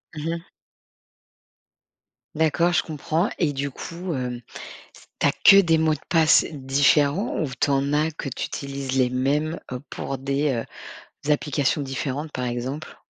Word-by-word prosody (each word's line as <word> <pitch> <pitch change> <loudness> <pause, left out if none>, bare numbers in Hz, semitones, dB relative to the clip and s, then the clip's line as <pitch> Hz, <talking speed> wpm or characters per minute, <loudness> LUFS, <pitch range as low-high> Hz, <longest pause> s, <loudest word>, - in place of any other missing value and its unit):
Mmh 155 +1 -3
mh. 165 - -8 1.9
D'accord, 165 +3 +2
je - - +4
comprends. 160 +3 -1
Et 150 -5 +1
du 140 +1 -2
coup, 170 +5 -6
hem, 125 -2 -4 0.8
tu - - +2
as - - +4
que 200 0 +7
des 165 -3 +3
mots 155 -1 +3
de - - -10
passe 160 -2 +5
différents 145 - +2
ou 150 - -1
tu 145 - +1
en 140 +1 +1
as 155 +2 +2
que 150 -2 -6
tu 130 - -4
utilises 135 -1 -4
les 125 -1 +4
mêmes, 145 +5 0
heu, 125 - -4
pour 135 - -4
des 140 +2 0
heu, 115 -2 -6 0.5
applications 145 0 0
différentes, 140 +2 -4
par 125 - -3
exemple? 125 +6 -4
145 Hz, 155 wpm, -24 LUFS, 135-160 Hz, 1.9 s, que